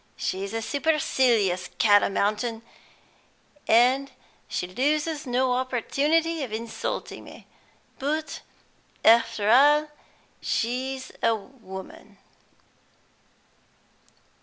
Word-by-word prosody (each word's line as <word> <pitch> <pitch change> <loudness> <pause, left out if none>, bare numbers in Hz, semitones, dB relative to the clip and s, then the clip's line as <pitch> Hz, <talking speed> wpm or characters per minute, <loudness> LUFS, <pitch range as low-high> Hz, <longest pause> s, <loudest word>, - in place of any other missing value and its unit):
She's 195 +1 -3
a 225 0 -3
supercilious 245 - +1
cat 205 -2 +5
o - - 0
mountain, 215 +3 -1 1.0
and 255 +4 +4 0.4
she - - -3
loses 295 - -1
no 250 +1 +1
opportunity 290 +6 0
of 250 - -6
insulting 225 +1 -5
me, - - -13 0.5
but 305 +3 -3 0.6
after 230 -2 +4
all 295 +4 +5 0.5
she's 260 +3 -2
a 230 - +3
woman." 195 -4 -11
245 Hz, 85 wpm, -25 LUFS, 220-280 Hz, 1.0 s, cat